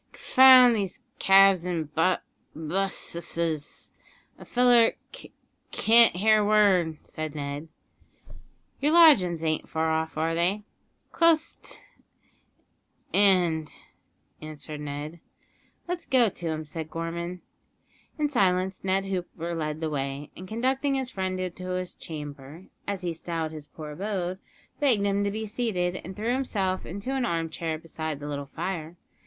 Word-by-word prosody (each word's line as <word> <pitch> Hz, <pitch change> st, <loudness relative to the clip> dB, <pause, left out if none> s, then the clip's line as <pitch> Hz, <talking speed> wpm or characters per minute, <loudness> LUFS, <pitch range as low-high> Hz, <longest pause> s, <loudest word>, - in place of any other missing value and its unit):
"C'found 255 Hz, -2 st, +7 dB
these 195 Hz, -4 st, -3 dB, 0.2 s
cabs 195 Hz, -2 st, +6 dB
an' 175 Hz, -3 st, -2 dB
b 175 Hz, +3 st, +3 dB, 0.4 s
busseses; 170 Hz, -2 st, -3 dB, 0.5 s
a -, -, -10 dB
feller 245 Hz, -2 st, +4 dB, 0.2 s
c -, -, -12 dB, 0.4 s
can't 230 Hz, -2 st, +5 dB
hear 215 Hz, +3 st, +4 dB
a 205 Hz, -, 0 dB
word," 190 Hz, -7 st, +3 dB
said 155 Hz, -1 st, -6 dB
Ned. 145 Hz, +1 st, -5 dB, 1.1 s
"Your 295 Hz, +3 st, +1 dB
lodgin's 195 Hz, -, +6 dB
an't 155 Hz, -1 st, -1 dB
far 160 Hz, 0 st, 0 dB
off, 160 Hz, 0 st, -2 dB
are 160 Hz, +1 st, 0 dB
they?" 180 Hz, +5 st, 0 dB, 0.5 s
"Close 330 Hz, -1 st, +3 dB
't -, -, -13 dB, 1.3 s
'and," 175 Hz, -6 st, +3 dB, 0.7 s
answered 155 Hz, 0 st, -8 dB
Ned. 150 Hz, +3 st, -6 dB, 0.7 s
"Let's 350 Hz, 0 st, -4 dB
go 250 Hz, -4 st, +4 dB
to 175 Hz, -2 st, -7 dB
'em," 155 Hz, -1 st, -3 dB
said 160 Hz, +1 st, -7 dB
Gorman. 170 Hz, +2 st, -5 dB, 0.8 s
In 300 Hz, -1 st, +1 dB
silence 190 Hz, -7 st, +1 dB
Ned 190 Hz, +1 st, 0 dB
Hooper 175 Hz, -3 st, -4 dB
led 155 Hz, -1 st, -3 dB
the 160 Hz, -, -1 dB
way, 140 Hz, 0 st, -4 dB
and, 185 Hz, -, -9 dB
conducting 265 Hz, +6 st, 0 dB
his 260 Hz, -1 st, -3 dB
friend 185 Hz, -1 st, -3 dB
into 185 Hz, 0 st, -5 dB
his 185 Hz, -1 st, -5 dB
"chamber," 145 Hz, +1 st, -9 dB, 0.2 s
as 200 Hz, -2 st, -3 dB
he 175 Hz, -1 st, -2 dB
styled 165 Hz, -1 st, -4 dB
his 155 Hz, -2 st, -9 dB
poor 150 Hz, 0 st, -9 dB
abode, 185 Hz, +1 st, -3 dB, 0.4 s
begged 245 Hz, -9 st, +2 dB
him 200 Hz, 0 st, +1 dB
to 200 Hz, -, 0 dB
be 220 Hz, +2 st, -4 dB
seated, 205 Hz, -6 st, -2 dB
and 185 Hz, +3 st, -8 dB
threw 225 Hz, +3 st, -1 dB
himself 200 Hz, -8 st, -1 dB
into 200 Hz, +9 st, -5 dB
an 265 Hz, -2 st, 0 dB
armchair 165 Hz, -4 st, -2 dB
beside 155 Hz, -2 st, -5 dB
the 145 Hz, -, -7 dB
little 140 Hz, -1 st, -5 dB
fire. 165 Hz, +1 st, -5 dB
180 Hz, 140 wpm, -26 LUFS, 160-210 Hz, 1.3 s, C'found